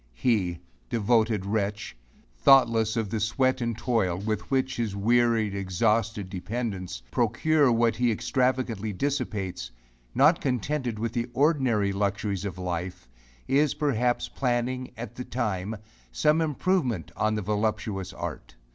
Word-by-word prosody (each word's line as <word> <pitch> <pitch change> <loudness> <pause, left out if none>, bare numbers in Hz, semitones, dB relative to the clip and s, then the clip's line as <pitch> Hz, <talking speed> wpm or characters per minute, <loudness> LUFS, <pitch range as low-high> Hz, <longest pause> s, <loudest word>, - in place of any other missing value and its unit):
He, 95 - +1 0.3
devoted 110 -2 +2
wretch! 105 0 -2 0.4
thoughtless 115 - +4
of 110 -3 -1
the 110 - -1
sweat 130 +5 +1
and 115 -2 -2
toil 110 -8 0
with 105 +2 -3
which 130 -1 0
his 110 -4 -2
wearied, 115 0 +2
exhausted 105 +2 0
dependents 95 - -4
procure 135 +5 +2
what 115 0 +2
he 120 -1 +2
extravagantly 120 -2 0
dissipates, 105 - -2 0.5
not 150 +7 +5
contented 125 -1 -1
with 115 +1 -3
the 120 0 -2
ordinary 130 -9 +2
luxuries 100 -1 -1
of 95 -3 -5
life, 90 -4 -4 0.4
is, 140 +2 +2
perhaps, 125 -5 0
planning, 125 0 -1
at 115 -1 -6
the 125 - -6
time, 110 -4 -2 0.4
some 150 - +2
improvement 150 - 0
on 110 0 +1
the 105 - -2
voluptuous 105 -2 -1
art. - - -7
115 Hz, 130 wpm, -27 LUFS, 100-125 Hz, 0.5 s, not